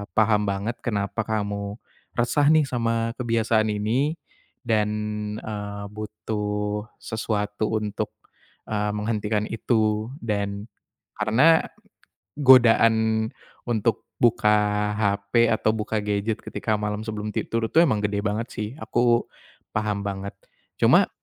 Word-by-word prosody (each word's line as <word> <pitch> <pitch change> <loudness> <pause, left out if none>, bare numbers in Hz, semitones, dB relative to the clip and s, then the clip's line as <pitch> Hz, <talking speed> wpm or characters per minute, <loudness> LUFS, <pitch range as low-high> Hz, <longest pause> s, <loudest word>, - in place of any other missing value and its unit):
paham 105 -1 +3
banget 100 +4 -2
kenapa 100 -1 -1
kamu 100 -1 -2 0.4
resah 125 +5 +2
nih 155 0 +5
sama 115 -2 0
kebiasaan 115 -2 +1
ini 120 +10 0 0.5
dan, 110 -3 +1 0.5
eee, 105 -1 -5
butuh 105 0 -3 0.2
sesuatu 105 -1 -2
untuk, 105 -1 -3 0.6
eee, 105 -1 -1
menghentikan 105 0 -1
itu. 110 -1 0 0.2
Dan 100 -1 -2 0.5
karena 130 +10 +4 0.7
godaan 115 -4 +5 0.4
untuk 115 -1 0
buka 105 -3 +3
HP 100 +3 +2
atau 110 0 +2
buka 110 +1 -2
gadget 105 +1 -1
ketika 110 -1 -1
malam 105 0 -2
sebelum 105 -1 -4
tidur 115 -1 -1
itu 165 - +6
emang 110 -11 +2
gede 100 0 0
banget 110 +3 -1
sih. 105 -1 -3
Aku 120 0 +2 0.5
paham 105 -2 -1
banget. 100 0 -4 0.5
Cuma - - +5
110 Hz, 110 wpm, -24 LUFS, 105-115 Hz, 0.7 s, itu